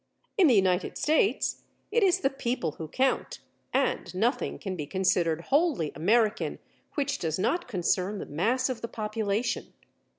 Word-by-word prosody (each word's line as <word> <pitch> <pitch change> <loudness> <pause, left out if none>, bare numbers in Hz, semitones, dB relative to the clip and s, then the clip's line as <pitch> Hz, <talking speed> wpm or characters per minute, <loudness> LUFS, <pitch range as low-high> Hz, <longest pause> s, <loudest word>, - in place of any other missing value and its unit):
In 375 -5 +5
the 250 - +5
United 190 -2 +2
States, 315 +6 +1 0.3
it 470 +2 +3
is 380 -1 +3
the 270 - +2
people 240 - -2
who 160 - -4
count 260 - 0 0.3
and - - 0
nothing 230 +8 0
can 195 -5 -5
be 150 -4 -5
considered 170 -2 +1
wholly 285 - +2
American 215 +7 +1 0.4
which 285 -1 -1
does 160 -2 -1
not 345 - 0
concern 190 -1 0
the - - -5
mass 230 - +1
of 250 -4 -4
the 230 - -3
population. 215 0 -2
220 Hz, 155 wpm, -28 LUFS, 180-270 Hz, 0.4 s, In